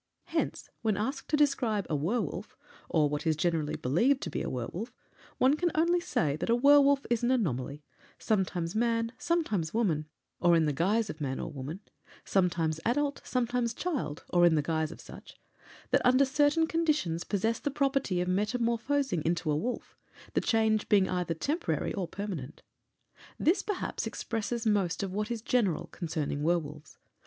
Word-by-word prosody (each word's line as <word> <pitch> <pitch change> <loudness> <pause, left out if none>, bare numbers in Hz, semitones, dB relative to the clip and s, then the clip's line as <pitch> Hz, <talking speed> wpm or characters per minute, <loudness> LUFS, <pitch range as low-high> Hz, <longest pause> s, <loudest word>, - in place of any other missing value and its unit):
Hence, - - -2
when 215 -4 +1
asked 265 +6 -3
to 300 - +2
describe 250 -9 +2
a 155 - -1
werwolf, 185 - -2 0.3
or 155 -3 +3
what 150 +3 -3
is 160 - +3
generally 160 -1 0
believed 235 - +2
to 165 - -4
be - - -2
a - - -3
werwolf, 165 - -4 0.5
one 265 +3 +4
can 350 +3 +1
only 340 +3 +3
say 150 - 0
that 155 - -3
a 230 - +5
werwolf 280 +2 +5
is 235 - +2
an 240 - +1
anomaly 150 - -1 0.3
sometimes 185 -5 -1
man, 230 0 +1
sometimes 220 - 0
woman 165 -10 +1 0.3
(or 175 -1 +5
in 165 -1 +3
the 150 - 0
guise 205 +9 +1
of 155 - -12
man 135 -2 -2
or - - -4
woman); 145 +7 -6 0.4
sometimes 170 -4 +1
adult, 285 +4 0
sometimes 245 -2 -1
child 275 - -3
(or 175 -1 +3
in 170 -2 +6
the 150 - +1
guise 160 0 -1
of - - -10
such) - - -12 0.5
that, - - +4
under 255 +2 +5
certain 290 +4 +3
conditions, 305 - 0
possesses 220 +3 -1
the - - -1
property 275 -9 0
of 180 - -2
metamorphosing 235 - 0
into 165 -1 0
a - - +2
wolf, 240 +11 -3 0.4
the - - +2
change 220 -2 +1
being 195 -3 +5
either 180 -2 -1
temporary 300 - -1
or 190 -5 -2
permanent. 175 -8 -6 0.7
This, 360 +5 +2
perhaps, 415 -3 -3
expresses 230 +1 -3
most 200 -5 +1
of 190 -2 -4
what 210 +2 -2
is 230 -2 -4
general 220 -11 +1
concerning 155 -4 -3
werwolves. 155 -2 -2
210 Hz, 170 wpm, -30 LUFS, 165-255 Hz, 0.7 s, in